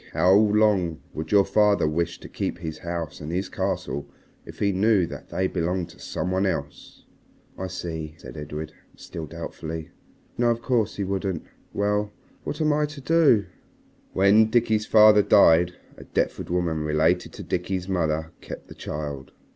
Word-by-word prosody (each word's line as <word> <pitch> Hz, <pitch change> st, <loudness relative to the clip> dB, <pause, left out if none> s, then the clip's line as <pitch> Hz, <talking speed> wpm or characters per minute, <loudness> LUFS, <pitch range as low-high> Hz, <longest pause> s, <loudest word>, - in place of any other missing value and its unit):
How 90 Hz, +1 st, +4 dB
long 105 Hz, -5 st, +3 dB
would 80 Hz, 0 st, -5 dB
your 100 Hz, -1 st, +5 dB
father 105 Hz, -6 st, +3 dB
wish 80 Hz, +2 st, -1 dB
to -, -, -9 dB
keep -, -, -3 dB
his 80 Hz, -3 st, -6 dB
house 85 Hz, -4 st, -5 dB
and 75 Hz, +2 st, -5 dB
his 90 Hz, +2 st, -2 dB
castle 70 Hz, -, -3 dB, 0.4 s
if -, -, -10 dB
he 100 Hz, -1 st, +1 dB
knew 100 Hz, 0 st, +3 dB
that -, -, -9 dB
they 95 Hz, -, -1 dB
belonged 90 Hz, -1 st, -1 dB
to -, -, -16 dB
some 90 Hz, -, -3 dB
one 95 Hz, +1 st, +1 dB
else?" 70 Hz, -6 st, -5 dB, 0.5 s
"I 95 Hz, -, -4 dB
see," 80 Hz, -3 st, -5 dB
said -, -, -11 dB
Edred, 75 Hz, +1 st, -6 dB, 0.2 s
still 80 Hz, -2 st, -8 dB
doubtfully. 80 Hz, -1 st, -7 dB, 0.5 s
"No, 120 Hz, -1 st, +3 dB
of 115 Hz, 0 st, -1 dB
course 115 Hz, -5 st, +1 dB
he 100 Hz, -, -2 dB
wouldn't. 95 Hz, -3 st, -2 dB, 0.3 s
Well, 105 Hz, 0 st, 0 dB, 0.3 s
what 150 Hz, -, -4 dB
am 155 Hz, -1 st, +3 dB
I 150 Hz, 0 st, +1 dB
to 150 Hz, 0 st, -10 dB
do?" 140 Hz, -8 st, +4 dB, 0.7 s
"When 105 Hz, +3 st, +5 dB
Dickie's 110 Hz, -2 st, +2 dB
father 105 Hz, -1 st, +7 dB
died, 90 Hz, -4 st, +5 dB, 0.2 s
a -, -, -10 dB
Deptford -, -, -2 dB
woman 85 Hz, -2 st, 0 dB
related 75 Hz, +1 st, +1 dB
to -, -, -8 dB
Dickie's 90 Hz, 0 st, -2 dB
mother 80 Hz, -3 st, -1 dB
kept -, -, -9 dB
the -, -, -9 dB
child. 75 Hz, -3 st, -6 dB
95 Hz, 165 wpm, -25 LUFS, 80-105 Hz, 0.7 s, father